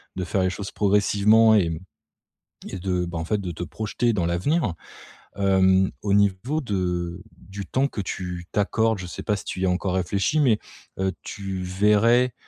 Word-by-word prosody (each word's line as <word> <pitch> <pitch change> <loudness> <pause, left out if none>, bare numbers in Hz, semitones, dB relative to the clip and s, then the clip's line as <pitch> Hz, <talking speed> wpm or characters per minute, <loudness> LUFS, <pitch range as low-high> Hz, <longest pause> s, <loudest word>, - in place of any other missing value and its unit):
de 95 - -2
faire 95 +2 0
les 95 - +2
choses 100 +2 -6
progressivement 105 +2 +4
et 85 -6 +2 0.9
et - - -6
de 90 -1 -1
bah, 85 -1 -5
en 80 - -3
fait 105 +4 0
de 90 - -4
te 85 +1 -6
projeter 110 +7 -1
dans 90 -5 0
l'avenir, 95 - 0 0.6
hem, 95 -1 +3
au 100 -1 0
niveau 100 +9 +1
de 90 - -2
du 95 +2 -8
temps 130 +8 +1
que 115 - -5
tu 90 -2 -5
t'accordes. 110 +1 +1
Je 90 - -6
sais 85 - -7
pas 105 -2 0
si - - -8
tu 95 - -5
y 95 - +1
as - - +2
encore 90 +1 -1
réfléchi, 100 - +1
mais, 120 -7 +4 0.4
heu, 95 0 0
tu 95 -2 -5
verrais 105 +6 +3
95 Hz, 185 wpm, -24 LUFS, 90-105 Hz, 0.9 s, progressivement